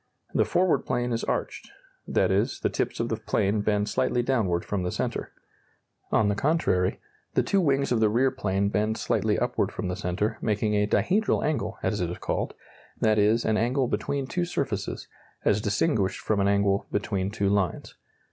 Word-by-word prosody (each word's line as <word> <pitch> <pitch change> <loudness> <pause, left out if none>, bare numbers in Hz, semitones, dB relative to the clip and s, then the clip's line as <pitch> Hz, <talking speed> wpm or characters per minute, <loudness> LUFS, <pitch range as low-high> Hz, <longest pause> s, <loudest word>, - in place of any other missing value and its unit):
The - - +3
forward 180 0 +2
plane 120 0 -2
is 115 - -2
arched; - - -3 0.4
that - - +2
is, - - 0
the - - 0
tips - - -2
of - - -1
the - - -1
plane 100 +2 0
bend 105 0 +1
slightly 125 -1 +1
downward 105 -10 0
from 100 -2 -2
the 90 - -1
centre. - - -3 0.8
On 110 - +3
the 105 - +2
contrary, 105 - +1 0.4
the - - +3
two 195 - +2
wings 140 -4 +1
of 120 - +2
the 110 -1 +4
rear 130 +5 +2
plane 100 0 0
bend 105 +2 0
slightly - - +1
upward - - 0
from - - -4
the 90 - -2
centre, 105 +6 -2
making 105 0 0
a 105 0 +2
dihedral 200 - +1
angle, 155 -1 -1
as 100 +1 0
it 85 - -1
is 90 - -5
called; - - -2 0.4
that 110 -1 +3
is, 110 +3 +3
an 110 -1 +2
angle 125 +3 +1
between 130 +6 -2
two 175 +6 -2
surfaces, 115 - -3 0.4
as 105 - +3
distinguished 105 - +1
from 105 -2 0
an 100 - +2
angle 100 0 +2
between 100 -1 -1
two 100 -1 -1
lines. 100 -4 -1
105 Hz, 185 wpm, -26 LUFS, 100-125 Hz, 0.8 s, the